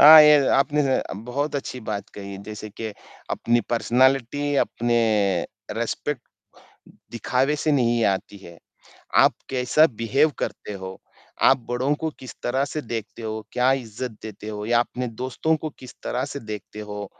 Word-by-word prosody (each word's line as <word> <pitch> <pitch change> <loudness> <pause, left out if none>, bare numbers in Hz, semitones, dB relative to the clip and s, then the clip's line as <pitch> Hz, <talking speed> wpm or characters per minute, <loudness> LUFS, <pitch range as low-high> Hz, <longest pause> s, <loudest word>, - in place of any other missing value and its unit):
अ, 155 +2 +12
ये 150 -2 +7
आपने 145 +2 +3
ज 135 -1 +2 0.3
बहुत 145 +3 -1
अच्छी 130 -2 -5
बात 100 -1 -3
कही 100 -1 -7
जैसे 110 0 -6
कि 110 +2 -5 0.4
अपनी 120 0 +2
पर्सनैलिटी, 130 +4 +2
अपने 120 -3 +1 0.8
रिस्पेक्ट 120 +3 -2 0.9
दिखावे 130 +5 +1
से 150 +1 +1
नहीं 120 -4 +3
आती 95 +1 -5
है। 85 -3 -12 0.6
आप - - +6 0.2
कैसा 130 +5 +4
बिहेव 135 +7 +3
करते - - -4
हो? 95 -1 -7 0.4
आप 135 - +6
बड़ो 130 +4 +1
को 160 - -1
किस 130 -3 -9
तरह 130 +3 +1
से 155 - -4
देखते 115 -1 -5
हो? 110 -1 -4
क्या 125 +2 +3
इज़्ज़त 125 -1 -4
देते 110 -1 -8
हो 105 -1 -5
या 120 0 +4
अपने 125 +1 -3
दोस्तों 145 +5 +1
को 155 - -3
किस 130 -1 -11
तरह 125 +1 -1
से 140 - -4
देखते 105 0 -6
हो, 105 -1 -6
120 Hz, 155 wpm, -24 LUFS, 110-140 Hz, 0.9 s, अ